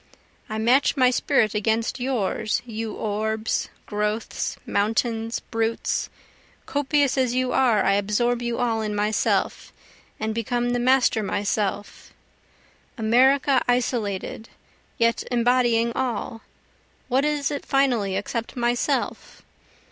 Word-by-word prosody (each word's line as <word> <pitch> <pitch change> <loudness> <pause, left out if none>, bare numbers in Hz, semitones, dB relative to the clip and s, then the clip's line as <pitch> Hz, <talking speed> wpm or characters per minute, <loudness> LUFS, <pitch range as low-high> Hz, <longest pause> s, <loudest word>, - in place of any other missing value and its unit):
I 215 - -3
match 250 +6 +3
my 255 -1 +5
spirit 240 -4 +2
against 220 +3 0
yours 225 -4 -1
you 225 -2 -5
orbs, 220 +1 -2 0.2
growths, 210 +1 -2
mountains, 225 +2 -1
brutes, 225 0 -1 0.6
Copious 285 -2 +1
as 250 -2 +1
you 255 0 0
are 240 -5 +3
I 195 - +4
absorb 210 +5 +1
you 235 -1 -2
all 230 -2 0
in 210 -1 -2
myself, 210 +1 0 0.5
and 220 0 -2
become 240 +2 -1
the 245 - 0
master 250 -2 +3
myself, 205 0 -3 0.8
America 260 +4 +4
isolated 230 -4 -1 0.5
yet 230 0 +2
embodying 240 -1 +2
all, 235 -3 -3 0.7
what 260 +2 +2
is 295 -1 0
it 285 - -4
finally 245 -8 +1
except 225 +4 -4
myself? 240 0 -1
230 Hz, 110 wpm, -24 LUFS, 220-250 Hz, 0.8 s, my